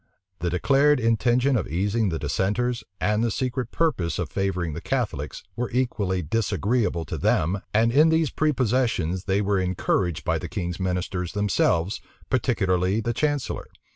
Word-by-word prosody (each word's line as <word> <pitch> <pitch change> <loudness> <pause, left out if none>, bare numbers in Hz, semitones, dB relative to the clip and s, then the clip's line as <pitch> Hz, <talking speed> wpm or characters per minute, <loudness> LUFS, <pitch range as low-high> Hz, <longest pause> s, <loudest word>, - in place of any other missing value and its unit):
The 90 - -1
declared 140 +10 +3
intention 120 +3 +2
of 110 - 0
easing 100 +5 0
the 80 - -2
dissenters, 115 +8 -1 0.2
and 105 +1 +1
the 120 - +2
secret 125 +1 -2
purpose 95 - 0
of 85 -5 -3
favoring 90 -4 -1
the 85 - -6
Catholics, 105 - -3
were 120 +2 -2
equally 100 -7 0
disagreeable 105 0 0
to - - -5
them 95 +5 +1
and 115 +2 +3
in 150 +6 +5
these 160 -3 +2
prepossessions 120 - 0
they 100 +1 +1
were 100 -1 +1
encouraged 90 -2 0
by - - +1
the - - -6
king's 90 -1 -4
ministers 90 -1 -2
themselves, 100 -3 +1 0.3
particularly 95 -6 +1
the 120 +1 -1
chancellor. 145 +1 -1
105 Hz, 150 wpm, -25 LUFS, 90-125 Hz, 0.3 s, in